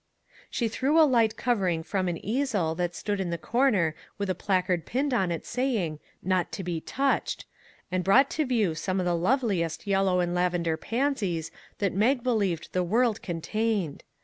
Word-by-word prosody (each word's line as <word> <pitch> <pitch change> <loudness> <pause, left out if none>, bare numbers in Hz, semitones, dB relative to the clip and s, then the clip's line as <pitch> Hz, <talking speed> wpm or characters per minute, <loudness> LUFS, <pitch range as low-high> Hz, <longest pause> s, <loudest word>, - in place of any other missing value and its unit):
She 235 - 0
threw 270 +8 +2
a 315 - +8
light 230 -6 +2
covering 190 -10 0
from 185 +1 -1
an 175 -1 -1
easel 215 - 0
that 175 +1 -2
stood 205 -1 -2
in 185 -2 -1
the 170 - -2
corner 210 - +2 0.2
with 200 -2 -1
a - - +1
placard 185 -2 0
pinned 270 +2 0
on 190 -7 +1
it 165 - -4
saying 225 - -1
" - - -37
Not 185 -1 +1
to 195 - -4
be 170 -2 -3
touched! 275 - -1 0.2
" - - -31
and 185 0 0
brought 220 +9 +5
to 310 - 0
view 220 -9 +2
some 185 +4 -2
of 180 - 0
the 175 -1 +2
loveliest 190 - 0
yellow 195 -2 +2
and 175 -1 0
laven 180 -1 +1
der 165 -1 +1
pansies 210 - -1 0.3
that 200 -3 0
Mag 235 +6 +2
believed 200 -9 0
the 185 - +2
world 225 +4 +1
con 170 -3 -4
tained. 215 -6 -1
195 Hz, 195 wpm, -27 LUFS, 175-235 Hz, 0.3 s, a